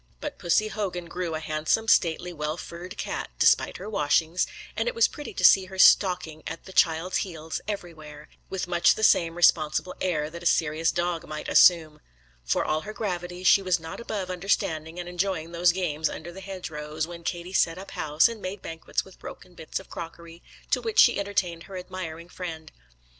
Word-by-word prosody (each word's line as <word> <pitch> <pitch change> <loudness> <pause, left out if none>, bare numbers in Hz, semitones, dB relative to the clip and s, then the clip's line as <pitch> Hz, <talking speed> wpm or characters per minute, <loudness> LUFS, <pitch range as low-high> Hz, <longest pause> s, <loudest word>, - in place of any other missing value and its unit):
But - - -6
Pussy 215 +5 +2
Hogan 185 -5 -3
grew 170 -1 -4
a - - -2
handsome, 155 +8 0
stately, 175 -3 +2
well 150 0 -3
furred 175 +1 -8
cat, - - -4
despite - - +3
her 190 - -8
washings; 165 -2 +1 0.3
and - - -1
it - - -1
was 465 - +5
pretty 295 - -8
to - - -3
see 190 - +7
her 190 +1 -10
stalking 180 -5 +4
at 165 - -7
the 190 - -11
child's 165 +2 +2
heels 160 -4 -4
everywhere, 155 -7 -7 0.2
with 190 -1 -3
much 175 -1 +4
the 220 - -4
same 165 -5 +4
responsible 170 +1 +3
air 155 -4 -1
that 170 +1 -8
a 175 - 0
serious 160 0 +2
dog 175 -1 -2
might 155 0 -6
assume. 160 -4 +5 0.4
For - - 0
all 155 0 0
her 215 - -7
gravity, 180 -4 -4
she 195 - +6
was 185 -3 +1
not 160 0 -8
above 200 -5 -4
understanding 175 -3 -1
and 175 - -5
enjoying 175 -2 -2
those 170 +1 +3
games 160 -4 -1
under 170 +2 -7
the 190 +2 -10
hedgerows, 160 -5 -5
when 170 0 -10
Katie 175 +2 -4
set 165 -2 +2
up 195 +1 -9
house, 150 +1 +3
and 230 -2 -7
made 185 +1 -6
banquets 165 0 -3
with 190 - -16
broken 180 - -10
bits 160 -2 -5
of 190 - -15
crockery, 170 0 -9 0.3
to - - +2
which 450 -2 -4
she - - +6
entertained 190 -4 -1
her 190 - -6
admiring 180 -3 -7
friend. 165 -3 -7
175 Hz, 190 wpm, -26 LUFS, 160-185 Hz, 0.4 s, see